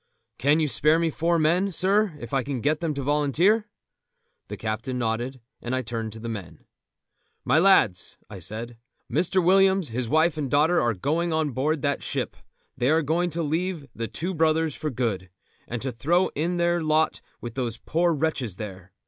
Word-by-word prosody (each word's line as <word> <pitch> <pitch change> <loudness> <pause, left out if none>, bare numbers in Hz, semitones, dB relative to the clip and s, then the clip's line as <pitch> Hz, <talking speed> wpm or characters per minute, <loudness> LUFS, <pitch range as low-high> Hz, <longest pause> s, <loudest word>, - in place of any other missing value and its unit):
"Can 145 +5 +3
you 155 - +2
spare 150 +4 +4
me 165 -1 +1
four 170 +3 +1
men, 175 +5 +2
sir, 195 -1 +1
if 120 +1 -9
I 135 - +2
can 135 -1 -4
get 150 +5 +1
them 160 -3 -2
to 140 - -3
volunteer?" 150 - +2 0.8
The - - -6
captain 115 +4 -3
nodded, 120 +2 -2 0.2
and 120 +2 -2
I 130 - -1
turned 115 -1 -4
to 110 - -9
the 115 - -6
men. 100 -7 -7 0.8
"My 160 - +4
lads," 140 - +3
I 100 -2 -9
said, 110 +6 -6 0.3
"Mr. 185 0 +2
Williams, 190 -2 +4
his 120 0 -3
wife 160 +1 +2
and 140 -3 -2
daughter, 155 +6 +3
are 120 -2 +1
going 160 - -1
on 160 -2 0
board 145 +3 -1
that 145 0 0
ship; - - -3 0.4
they 125 0 +1
are 160 +1 +3
going 170 +4 +1
to 170 +1 -2
leave 165 +1 -2
The 115 0 -4
Two 165 - -3
Brothers 160 -1 +2
for 155 - -3
good, 110 -8 -2 0.4
and 120 0 -4
to 135 - -2
throw 165 +10 +1
in 170 +4 -2
their 175 0 +1
lot 155 0 +1 0.2
with 120 -2 -7
those 120 -3 -2
poor 170 +7 +1
wretches 145 - -1
there. 95 -2 -9
150 Hz, 190 wpm, -25 LUFS, 120-165 Hz, 0.8 s, spare